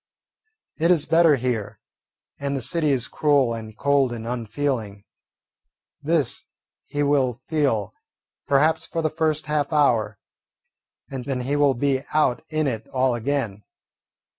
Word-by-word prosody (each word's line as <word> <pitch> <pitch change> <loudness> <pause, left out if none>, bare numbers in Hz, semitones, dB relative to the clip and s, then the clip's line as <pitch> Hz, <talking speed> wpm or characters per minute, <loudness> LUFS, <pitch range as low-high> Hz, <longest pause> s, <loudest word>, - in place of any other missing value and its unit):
It 165 +2 +3
is 170 -5 +4
better 165 -2 +5
here, 110 -5 -3 0.6
and 140 0 -2
the - - -4
city 155 +5 +1
is 130 -3 0
cruel 140 -5 +2
and 110 -2 -8
cold 140 -3 +2
and 115 -1 -6
unfeeling. 115 -3 -3 1.0
This 150 -3 0 0.4
he 145 0 -1
will 140 -3 +2
feel, 135 - 0 0.5
perhaps, 150 +3 +2
for 165 - -3
the 155 - +1
first 155 -1 0
half 150 -1 -1
hour, 115 -9 +2 0.9
and 130 -2 -5
then 135 -2 -2
he 135 +3 -1
will 145 -2 +3
be 135 +1 0
out 150 -4 +2
in 155 -1 0
it 115 -5 -3
all 130 -1 +1
again. 120 -4 -2
135 Hz, 140 wpm, -23 LUFS, 120-150 Hz, 1.0 s, better